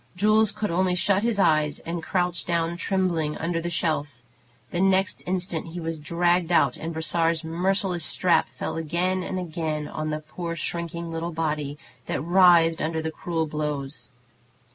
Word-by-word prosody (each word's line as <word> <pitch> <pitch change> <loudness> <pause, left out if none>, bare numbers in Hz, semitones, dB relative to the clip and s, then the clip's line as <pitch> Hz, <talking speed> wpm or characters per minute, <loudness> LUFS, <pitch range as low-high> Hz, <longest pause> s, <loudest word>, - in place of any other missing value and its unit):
Jules 215 +2 +4
could 210 -2 -3
only 180 +1 +2
shut 195 +2 +2
his 230 -1 0
eyes 155 -6 +3
and 170 0 -4
crouch 175 +1 -1
down 170 0 0
trembling, 175 -5 0
under 165 0 -1
the 170 - -3
shelf. 160 -3 0 0.6
The 175 - -1
next 190 0 +2
instant 180 -3 -2
he 175 - -4
was 165 -1 -4
dragged 175 +2 +1
out, 140 -7 +4
and 165 - -5
Brossard's 165 0 0
merciless 180 +1 0
strap 175 +3 +2
fell - - -3
again 175 +4 0
and 185 - -3
again 160 -4 -3
on 155 +1 -4
the 155 0 -2
poor 170 +2 -5
shrinking 170 0 -3
little 165 +1 -3
body, 150 -3 -2 0.3
that - - -1
writhed 170 -2 +5
under 160 +1 -1
the 160 0 -2
cruel 165 0 -2
blows. 150 -2 -4
170 Hz, 165 wpm, -25 LUFS, 160-180 Hz, 0.6 s, writhed